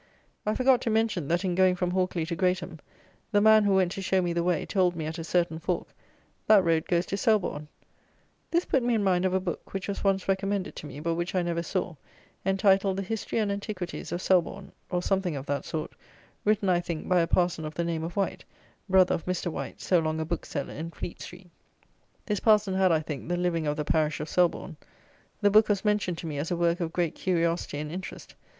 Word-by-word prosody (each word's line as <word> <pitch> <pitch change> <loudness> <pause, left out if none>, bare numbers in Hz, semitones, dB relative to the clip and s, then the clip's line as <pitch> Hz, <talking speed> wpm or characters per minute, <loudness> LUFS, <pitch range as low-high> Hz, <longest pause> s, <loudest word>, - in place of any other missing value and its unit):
I 215 - +1
forgot 255 -1 +4
to - - -1
mention, 220 -8 +1
that, 175 +4 0
in 180 - 0
going 185 0 +4
from 180 0 -1
Hawkley 185 -3 0
to 170 +1 -3
Greatham, 180 -2 -1 0.5
the 205 - +4
man, 215 0 +6
who 200 -1 +3
went 185 -2 +3
to 195 - -5
show 190 0 +1
me 175 -2 0
the 170 - 0
way, 175 -3 0
told 180 -3 +1
me 160 -2 -4
at 160 +2 -4
a - - -4
certain 170 -1 0
fork, - - -2 0.6
"That 210 -3 +7
road 165 -2 +1
goes 175 0 +1
to 195 - -3
Selborne." 190 -8 +1 0.8
This 340 +1 +1
put 265 - +2
me 240 -1 +1
in 215 - +1
mind 185 -2 +2
of 185 - +1
a - - +3
book, 185 +1 -6
which 190 -2 -3
was 200 - -4
once 195 -1 +1
recommended 195 0 -1
to 150 - -7
me, 145 0 -8
but 165 +1 0
which 170 +2 -3
I 180 - +2
never 170 -1 -1
saw, 180 +1 -2 0.5
entitled 195 0 +3
"The 195 - -1
History 220 +3 -3
and 210 -2 +1
Antiquities 200 -3 -5
of 175 - -3
Selborne," 190 +1 +1 0.2
(or 180 -1 -1
something 190 -4 0
of 135 -1 -5
that 145 0 -2
sort) 155 -1 -4 0.5
written, 210 -1 +2
I 180 -2 +3
think, 170 -2 -5
by 180 -1 +4
a 165 - +2
parson 175 -2 +1
of 155 0 -6
the 170 - -1
name 165 -1 -2
of 170 +1 -5
White, 200 -1 -1 0.5
brother 185 -1 +5
of 165 - -3
Mr. 180 -1 -1
White, - - -6
so 180 - +3
long 155 0 -1
a 160 - -1
Bookseller 155 -3 -4
in 160 +3 -5
Fleet 170 - -7
street. 180 -1 -11 0.7
This 210 -3 -1
parson 210 -2 +3
had, 190 -1 +3
I 160 -1 +3
think, 150 0 -6
the 175 - 0
living 170 -3 0
of 150 - -1
the 150 - -2
parish 155 -1 +1
of 150 - -4
Selborne. 175 -2 0 0.6
The 205 -1 +4
book 215 +1 +5
was 205 0 0
mentioned 205 -5 +1
to - - -7
me 150 -3 -4
as 155 - -3
a 175 - -1
work 170 +1 +1
of 165 -2 -2
great 170 -1 0
curiosity 170 -4 -1
and 150 +1 -4
interest. 185 +3 -7
180 Hz, 230 wpm, -27 LUFS, 165-195 Hz, 0.8 s, That